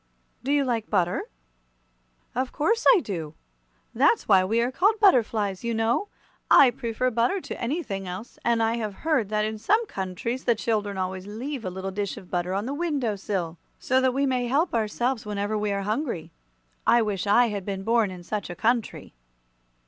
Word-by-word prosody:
"Do 270 - -1
you 290 -1 +3
like 230 -3 -2
butter?" 180 -4 +1 1.1
"Of 255 +1 -2
course 450 +10 +1
I 375 - +2
do! 160 - -5 0.6
That's - - +3
why 190 -1 +6
we 220 +5 +1
are 240 +2 +1
called 405 +10 +2
butterflies, 225 - +3
you 235 -1 -1
know. 225 - +1 0.4
I 265 -3 +8
prefer 250 0 -2
butter 240 - +1
to - - -7
anything 235 - -3
else, 185 +6 -8
and 235 -1 +2
I 225 +1 +1
have 215 -4 -4
heard 280 -11 +2
that 215 0 +1
in 215 0 -4
some 425 - +2
countries 230 - -4
the 235 - +3
children 210 -3 -1
always 185 0 -3
leave 245 +5 -5
a 185 - -2
little 190 +1 -5
dish 200 0 -3
of 180 - -12
butter 180 +1 -1
on 200 +2 -1
the 270 - -3
window 285 -9 -1
sill, 180 -4 -3 0.2
so 260 +1 +1
that 260 0 +3
we 280 +1 +2
may 250 -2 0
help 295 +8 +1
ourselves 235 +2 0
whenever 205 +1 -2
we 210 -1 -1
are 200 0 -1
hungry. 215 - -3 0.6
I 235 -1 +5
wish 205 -2 -2
I 235 +4 +5
had 200 -2 -4
been 195 0 -4
born 225 -1 +2
in 180 -1 -9
such 205 +2 -4
a 175 - -6
country." 230 +3 -1
225 Hz, 190 wpm, -25 LUFS, 200-255 Hz, 1.1 s, I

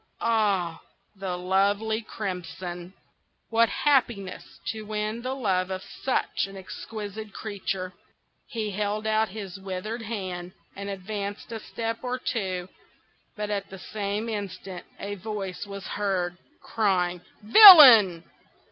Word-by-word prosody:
Ah! 200 -7 +1 0.3
the 190 -2 -4
lovely 200 +4 +1
Crimson! 180 -3 -6 0.6
What 230 0 +4
happiness 235 -10 0
to 220 - -4
win 215 +1 -3
the 255 +2 -3
love 190 -7 0
of 190 0 -4
such 260 -6 -2
an 195 0 -11
exquisite 210 +2 -7
creature!" 190 -3 -4 0.5
He 215 -3 -3
held 210 +2 -2
out 220 0 +2
his 195 -2 -7
withered 195 +5 -5
hand, 185 -5 -5 0.2
and 200 0 -6
advanced 200 +2 -5
a 225 - -4
step 225 +1 -4
or 250 0 -2
two; 190 -8 -3 0.7
but 210 0 -4
at 200 -1 -3
the 195 - -9
same 205 +3 -4
instant 195 -4 -6
a 200 +1 -4
voice 205 -1 -5
was 200 -2 -8
heard, 185 -4 -1 0.3
crying, 180 -5 0 0.2
"Villain! 230 - +10
205 Hz, 120 wpm, -26 LUFS, 185-220 Hz, 0.7 s, Villain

